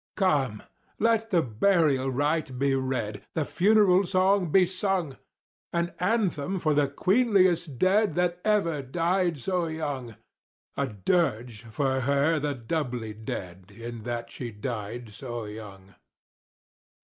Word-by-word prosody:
Come! 140 - +1 0.3
let 225 0 +2
the 175 -5 +3
burial 135 - +2
rite 145 0 -1
be 140 +1 +2
read—the 130 +2 -2
funeral 190 +4 +4
song 185 -2 +2
be 190 +1 +6
sung!— 185 -5 -1 0.5
An 170 0 -1
anthem 190 -4 0
for 155 -4 +1
the 145 -1 +3
queenliest 185 - +2
dead 190 - +3
that 180 0 0
ever 195 -9 +1
died 170 +5 0
so 175 +5 -1
young— 145 -8 -4 0.6
A - - 0
dirge 115 - -1
for 130 +3 -1
her 140 +4 +2
the 145 -1 -2
doubly 125 -4 -3
dead 95 -4 -7
in 115 +2 -8
that 120 +1 -5
she 125 - -6
died 110 0 -6
so 120 0 -6
young. 100 -2 -10
145 Hz, 125 wpm, -27 LUFS, 120-180 Hz, 0.6 s, be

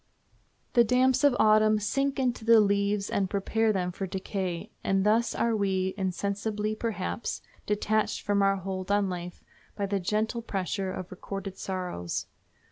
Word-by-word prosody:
The 240 - +6
damps 255 +4 +3
of 285 -3 +5
Autumn 215 0 +5
sink 275 +6 0
into 250 -3 0
the 230 0 +7
leaves 200 0 +2
and 195 -2 0
prepare 220 +3 +1
them 180 -3 -1
for 190 +2 -4
decay, 185 -2 -4
and 195 0 +1
thus 220 +2 +2
are 230 -1 +1
we, 190 -2 0
insensibly 205 +2 -2
perhaps, 215 0 -3 0.2
detached 210 +1 0
from 205 -1 +2
our 195 0 +4
hold 190 0 -5
on 200 -2 +2
life 175 0 -6 0.3
by 200 - -1
the 200 0 -1
gentle 215 +5 -1
pressure 195 -2 -2
of 185 -1 -6
recorded 195 +1 -6
sorrows. 180 - -3
200 Hz, 150 wpm, -28 LUFS, 190-220 Hz, 0.3 s, the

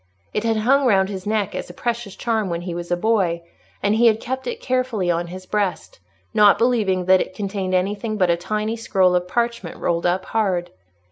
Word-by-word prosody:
It 210 - -1
had 225 -1 +1
hung 265 +5 +3
round 195 -4 +3
his 190 -1 -6
neck 210 -2 0
as - - -5
a 175 - -11
precious 235 -3 -3
charm 220 -4 -1
when 170 0 -2
he 175 -1 -5
was 175 0 -6
a 175 - +1
boy, 180 -5 +1 0.4
and 205 +1 +3
he 235 +2 +5
had 220 -1 +3
kept 260 +3 -4
it 470 -1 -3
carefully 255 - 0
on 170 0 -1
his 185 +2 -9
breast, 210 - -2 0.3
not 210 -2 +6
believing 210 -6 +1
that 185 0 +5
it 185 - -5
contained 195 -2 -2
anything 205 +4 -1
but 185 -3 +3
a - - +3
tiny 215 +5 -2
scroll 190 -5 +2
of 180 0 +1
parchment 235 -4 -2
rolled 170 0 0
up 185 +2 0
hard. 185 -6 -1
200 Hz, 210 wpm, -21 LUFS, 180-225 Hz, 0.4 s, not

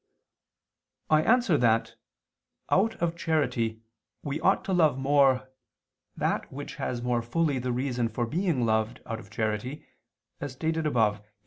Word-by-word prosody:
I 155 0 +6
answer 225 - +3
that, 115 -1 +2 0.8
Out 220 +4 +3
of 170 -1 -1
charity 125 -9 -1 0.4
we 145 +1 -3
ought 190 - +2
to 190 - -1
love 160 -7 +4
more 135 -1 +3 0.7
that - - -1
which - - -7
has 120 -1 -3
more 120 -1 +1
fully 140 +3 0
the 125 0 -2
reason 125 -2 -1
for 120 +2 -2
being 160 -2 0
loved 110 +2 0
out 115 0 -4
of - - -13
charity, 110 +6 -3 0.5
as 145 -2 -5
stated 160 +3 -1
above 110 -6 +2
(A. - - -24
130 Hz, 145 wpm, -28 LUFS, 115-160 Hz, 0.8 s, I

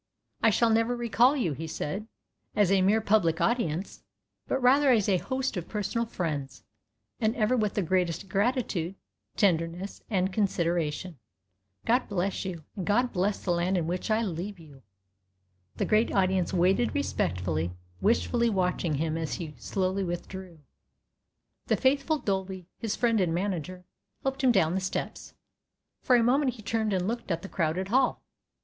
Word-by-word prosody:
"I - - +5
shall 225 +2 +3
never 230 +2 +2
recall 240 +4 +3
you," 175 - 0
he 160 +3 -6
said, 190 +7 -4 0.5
"as 205 -3 +3
a 195 -1 +4
mere 205 +4 +3
public 200 -6 +2
audience, 195 -7 -1 0.5
but - - 0
rather 270 +3 +5
as 225 -6 +4
a 195 -2 +3
host 260 -2 -2
of 175 - -4
personal 215 +2 -1
friends, 140 - -4 0.6
and 220 +2 +1
ever 225 0 +2
with 215 -4 0
the 205 - +1
greatest 180 +1 0
gratitude, 200 - 0 0.4
tenderness, 175 0 0
and 190 -3 0
consideration. 170 - -1 0.7
God 245 +2 +2
bless 195 -1 -1
you, 175 -4 -5
and 190 - -4
God 245 +4 +2
bless 195 +2 0
the 180 - +1
land 175 +2 +1
in 170 - 0
which 180 +6 -3
I 220 +1 +2
leave 190 +1 -4
you!" 145 -5 -15 0.9
The - - -1
great 215 +1 +2
audience 185 -2 +2
waited 190 +8 +2
respectfully, 90 - -1 0.3
wistfully 235 +2 +2
watching 180 -5 0
him 155 +2 -1
as 160 - -2
he 160 -3 -6
slowly 190 0 -1
withdrew. 175 -1 -6 1.1
The - - +2
faithful 275 +4 +2
Dolby, 190 - -3
his 220 -2 -2
friend 230 -4 +2
and 170 -3 +1
manager, 180 -1 -3 0.4
helped 270 0 -2
him 255 - +6
down 175 -7 +3
the 190 - 0
steps. 190 - -4 0.7
For 255 - +4
a 235 - +4
moment 260 +2 +3
he 220 - -12
turned 220 0 0
and 185 -1 0
looked 235 0 -3
at 170 -1 -1
the - - -5
crowded 180 +3 -1
hall. 255 +3 +2
195 Hz, 160 wpm, -28 LUFS, 175-230 Hz, 1.1 s, him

